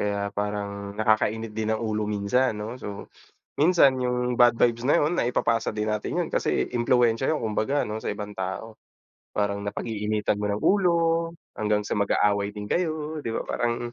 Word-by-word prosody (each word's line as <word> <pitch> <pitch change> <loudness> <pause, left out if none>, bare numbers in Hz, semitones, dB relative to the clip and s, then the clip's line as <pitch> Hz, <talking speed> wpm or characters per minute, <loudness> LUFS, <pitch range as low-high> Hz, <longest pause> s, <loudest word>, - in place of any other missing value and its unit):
kaya 100 0 -1
parang 100 0 -4
nakakainit 110 +1 +1
din 110 0 -2
ng - - -7
ulo 105 -1 -1
minsan 105 +3 +1
'no, 115 +4 -6
so 100 -1 -6 0.5
minsan 150 -4 +5
yung 125 0 0
bad 120 -1 +5
vibes 120 0 +2
na 140 - +4
'yon, 155 +4 +1
naipapasa 115 -4 +1
din 105 0 -2
natin 105 -1 -1
yun - - 0
kasi - - 0
impluwensiya 120 +2 +2
'yon 155 - 0
kumbaga 115 +5 0
ano, 105 - -4
sa - - -1
ibang 105 0 -6
tao. 95 +4 -5 0.6
Parang 100 -1 0
napag-iinitan 105 0 -2
mo 105 - -1
ng 100 +1 -1
ulo 190 -3 +4 0.6
hanggang 105 -1 0
sa - - -4
mag-aaway 100 0 +2
din 105 0 -7
kayo 155 +2 -2
'di 120 - -5
ba, 115 - -2
parang 120 0 -2
110 Hz, 170 wpm, -26 LUFS, 105-125 Hz, 0.6 s, minsan